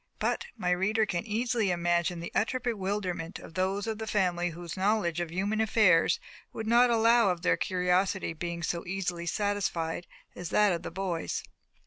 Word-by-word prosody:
But 475 - -1
my 180 -1 0
reader 210 +5 +2
can 180 0 -3
easily 225 -1 0
imagine 175 0 0
the 170 - -6
utter 230 +4 +1
bewilderment 195 -7 -2
of - - -12
those 190 +3 0
of 220 -1 -3
the 220 - -4
family 180 -4 +1
whose 170 0 -7
knowledge 190 -3 +1
of 175 -1 -2
human 200 +6 -1
affairs 210 -6 +4 0.3
would 220 - -5
not 240 +2 +5
allow 230 -1 +4
of 175 -1 -2
their - - +4
curiosity 185 0 0
being 170 +1 -5
so 170 +1 -2
easily 180 -2 -3
satisfied 175 -4 -1 0.3
as 175 -2 -6
that 210 -1 +4
of 170 - -3
the - - -5
boys. 180 -2 -3
185 Hz, 170 wpm, -29 LUFS, 175-215 Hz, 0.3 s, not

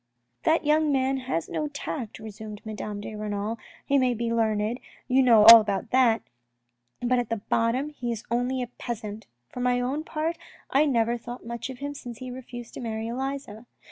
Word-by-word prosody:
"That 325 -1 +3
young 305 0 +3
man 270 0 +1
has 255 -11 -2
no 305 - -2
tact," 285 -5 -5
resumed 215 -1 -8
Madame 210 -1 -5
de 215 - -7
Renal. 210 +1 -3
" - - -24
He 280 0 +3
may 250 -2 +2
be 230 +1 -1
learned, 220 +1 +1 0.3
you 260 +1 +4
know 230 -5 +6
all 230 0 +12
about 205 0 -3
that, 245 -3 +4 0.8
but 245 +1 +2
at 230 -3 -3
bottom 245 +6 +1
he 245 -5 -4
is 230 -1 -4
only 250 +2 0
a - - -5
peasant. 220 -2 -5 0.2
For - - -8
my 245 0 +2
own 265 +5 -1
part 325 +1 -2 0.3
I 290 +3 +4
never 235 -2 +1
thought 240 +1 -8
much 235 +1 -5
of 260 - -7
him 285 +2 -4
since 245 -5 -8
he 255 0 -7
refused 245 -2 -9
to - - -7
marry 225 -1 -3
Elisa. 260 -3 -5
240 Hz, 190 wpm, -26 LUFS, 220-260 Hz, 0.8 s, all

